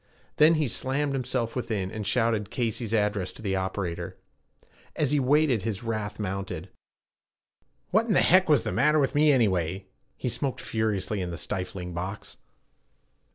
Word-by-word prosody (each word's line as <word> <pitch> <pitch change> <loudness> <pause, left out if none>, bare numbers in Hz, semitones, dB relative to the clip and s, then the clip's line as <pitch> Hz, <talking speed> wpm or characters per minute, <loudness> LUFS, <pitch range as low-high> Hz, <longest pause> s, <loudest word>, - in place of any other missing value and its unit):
Then 155 +2 +6
he 155 -2 +1
slammed 135 +4 -1
himself 125 -3 -2
within, 105 -7 -2
and 105 -2 -5
shouted 110 -2 +1
Casey's 115 -2 -2
address 105 -4 0
to - - -13
the 95 -2 0
operator. 95 -2 -3 0.8
As 145 -3 +1
he 150 - +3
waited, 140 -3 +3
his 110 +1 -3
wrath 110 -2 -3
mounted. 95 -3 -4 1.2
'What 220 +4 +3
in 210 - +2
heck 185 0 +5
was 150 - +5
the - - -2
matter 150 +4 +3
with 140 -3 +2
me 150 +1 +5
anyway!' 95 - +1 0.3
He - - -3
smoked 135 +2 -2
furiously 110 -2 -1
in 90 - -3
the 85 - -5
stifling 90 -2 -4
box. 95 +4 -5
110 Hz, 155 wpm, -27 LUFS, 95-135 Hz, 1.2 s, Then